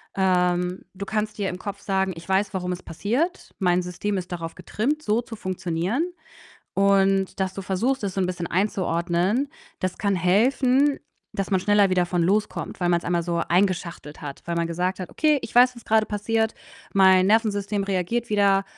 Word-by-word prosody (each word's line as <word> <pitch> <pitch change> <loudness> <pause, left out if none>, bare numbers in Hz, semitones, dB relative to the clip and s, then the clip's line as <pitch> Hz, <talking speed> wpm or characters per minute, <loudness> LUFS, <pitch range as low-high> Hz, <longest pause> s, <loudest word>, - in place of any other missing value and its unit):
Ähm, 180 -1 +1
du 200 +1 -6
kannst 215 +1 -2
dir 200 -2 -1
im 180 - -5
Kopf 200 0 -6
sagen: 190 -1 0
„Ich 165 +2 -11
weiß, 195 +2 +1
warum 180 -1 -2
es 180 - -4
passiert. 245 - -2
Mein 180 -1 +2
System 195 +3 -3
ist 180 -1 -5
darauf 165 -1 -5
getrimmt, 290 +8 -2
so 215 +3 +1
zu 230 -1 -9
funktionieren.“ 185 - -2 0.7
Und 195 -1 +2
dass 190 0 -1
du 195 - -5
versuchst, 225 +7 -1
es 195 -2 -2
so 190 - +1
'n - - +2
bisschen 175 -1 -3
einzuordnen, 185 +5 0 0.3
das 185 -1 -2
kann 200 -2 +1
helfen, 255 +9 +3 0.3
dass 195 0 -3
man 190 - +3
schneller 205 -1 +4
wieder 180 -1 +2
von 175 -1 0
loskommt, 205 +2 -1
weil 175 - +2
man's 170 -1 +2
einmal 175 -1 0
so 170 -1 -1
eingeschachtelt 175 -4 -1
hat, 140 -2 -7
weil 170 0 -2
man 170 0 0
gesagt 180 +3 -2
hat: 180 - -6
„Okay, 305 -2 +2
ich - - -8
weiß, 250 +1 +6
was 235 - -12
grade 220 0 +3
passiert. 220 +2 0 0.4
Mein 190 -1 +6
Nervensystem 205 -2 +1
reagiert 195 +5 -1
wieder, 200 -2 +3
195 Hz, 185 wpm, -24 LUFS, 180-210 Hz, 0.7 s, weiß